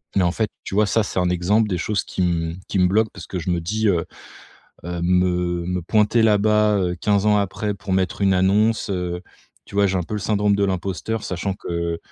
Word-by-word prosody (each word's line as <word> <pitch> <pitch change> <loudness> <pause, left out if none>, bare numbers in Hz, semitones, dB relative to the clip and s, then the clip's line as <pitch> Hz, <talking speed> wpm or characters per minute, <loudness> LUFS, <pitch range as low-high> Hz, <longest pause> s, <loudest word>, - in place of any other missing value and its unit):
Mais 95 - +3
en 85 - +2
fait, 110 +2 -1
tu - - -5
vois, 105 +1 +4
ça 115 - +2
c'est 95 - -6
un 90 -1 +1
exemple 105 +5 +2
des 90 - -1
choses 105 +1 -1
qui - - -4
me 85 -2 0
qui 100 - -2
me 90 - +5
bloque 110 +3 +2
parce 90 -4 -9
que 90 - -4
je 90 - -4
me 85 - 0
dis, 110 +5 -1
heu 85 -3 +1 0.8
heu, 90 0 -4
me 90 -1 +1
me 90 0 -1
pointer 105 +5 +2
là-bas, 105 0 +3
heu, 90 -2 0
15 100 -1 +1
ans 105 -1 +4
après 100 +1 -2
pour 95 0 -6
mettre 95 0 -1
une 95 -1 +4
annonce, 105 +4 +2
heu. 90 -1 -3 0.4
Tu - - -14
vois, 100 0 +4
j'ai 95 0 0
un - - -1
peu 105 - -10
le 105 - -2
syndrome 105 0 +1
de 100 - +2
l'imposteur 95 +3 -2
sachant 95 +2 -3
que, 85 -3 -3
95 Hz, 235 wpm, -22 LUFS, 90-105 Hz, 0.8 s, me